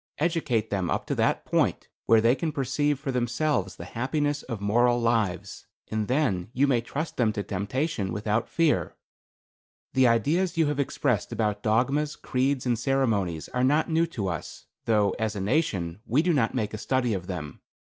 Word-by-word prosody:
Educate 145 -9 0
them 95 -4 -1
up - - -1
to - - -2
that - - +1
point - - 0 0.2
where 115 -1 +6
they 115 +2 +4
can 155 +4 -2
perceive 145 +1 0
for 140 -1 -3
themselves 120 -4 0
the 85 - -8
happiness 145 - -1
of 115 -5 -6
moral 120 +4 +3
lives, 105 -5 -1 0.2
and 110 -1 -1
then 120 - 0
you 135 +3 +3
may 130 -4 +2
trust 145 +7 -5
them 115 -3 +3
to 105 - -3
temptation 105 - -2
without 105 +2 -1
fear. 165 -3 +1 1.0
The 130 -1 +5
ideas 160 - +1
you 165 - +4
have 145 -1 -2
expressed 135 -4 0
about 105 -2 -1
dogmas, 135 +8 +1
creeds 130 +1 -1
and 120 -3 +1
ceremonies 110 - 0
are 125 - -1
not 150 +5 +2
new 165 +1 +3
to 115 - -4
us, 85 -5 -5 0.2
though, 105 -3 +3
as 110 -1 -1
a - - -3
nation, 95 - 0
we 135 +8 +3
do 175 -1 +2
not 130 -4 +1
make 110 -5 -1
a 110 - -4
study 125 0 0
of 90 -3 -4
them. 80 -6 -6
120 Hz, 180 wpm, -26 LUFS, 105-145 Hz, 1.0 s, where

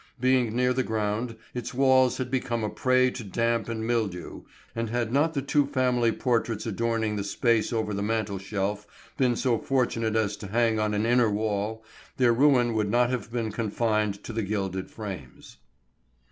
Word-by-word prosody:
Being 125 -3 +2
near 125 0 +2
the 130 - +1
ground, 110 +1 -2 0.2
its 125 0 -5
walls 130 -1 +4
had 125 -1 -4
become 120 -3 -1
a 105 - -2
prey 130 0 +2
to 120 - -7
damp 115 +3 -1
and 110 -1 -3
mildew, 110 -7 -2 0.3
and 115 -1 -2
had 120 0 -1
not 160 +4 +2
the 140 - -1
two 140 0 +2
family 125 -4 +2
portraits 115 -2 -1
adorning 110 -1 -1
the 100 - -2
space 115 +3 +1
over 110 -3 -1
the 100 - -2
mantel 105 -2 -1
shelf 105 +1 -3 0.3
been 125 -3 +2
so 120 -2 +1
fortunate 115 -4 0
as 105 -2 +1
to 105 - -8
hang 115 +1 +1
on 105 -1 0
an 105 +2 0
inner 120 -1 +4
wall, 105 +1 -2 0.3
their 125 -2 +4
ruin 125 -2 +4
would 105 -2 0
not 120 +3 +3
have 115 -3 -3
been 115 -2 -2
confined 105 -2 -1
to 115 - -7
the 115 - -1
gilded 95 -2 -3
frames. 95 - -9
115 Hz, 180 wpm, -27 LUFS, 105-125 Hz, 0.3 s, walls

